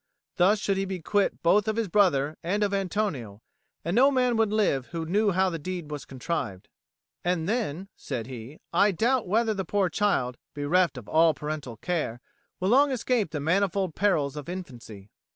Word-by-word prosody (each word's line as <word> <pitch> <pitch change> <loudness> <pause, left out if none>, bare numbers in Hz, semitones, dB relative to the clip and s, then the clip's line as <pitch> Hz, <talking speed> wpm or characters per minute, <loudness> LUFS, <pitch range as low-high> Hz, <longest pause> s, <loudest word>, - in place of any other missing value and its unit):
Thus 190 +4 +4
should 195 -1 -1
he 195 - 0
be 190 -1 -4
quit 200 +4 0
both 205 +5 +4
of 215 - 0
his 225 -2 0
brother 160 -7 +2
and 200 +5 0
of 200 -1 0
Antonio, 180 - -2 0.4
and 170 +3 -1
no 265 +4 +6
man 250 -3 +2
would 225 -2 +2
live 195 -12 +1
who 165 -1 -4
knew 205 +6 +2
how 190 0 +2
the 165 - -4
deed 175 -1 -5
was 145 -1 -5
contrived. 130 - -4 0.5
"And 175 -2 0
then," 195 -6 -2
said 125 -5 -5
he, 125 +3 -9 0.2
"I 200 +4 +5
doubt 230 +5 +1
whether 220 +3 +2
the 195 -2 -3
poor 195 +1 +1
child, 145 - 0 0.2
bereft 150 +1 +1
of 120 - -9
all 160 0 +4
parental 150 -6 -5
care, 150 -5 -2 0.4
will 185 - 0
long 280 +5 +5
escape 245 - 0
the 150 -1 -4
manifold 185 +3 +1
perils 155 -9 +1
of 150 +1 -7
infancy." 120 - -8
180 Hz, 185 wpm, -27 LUFS, 145-205 Hz, 0.5 s, no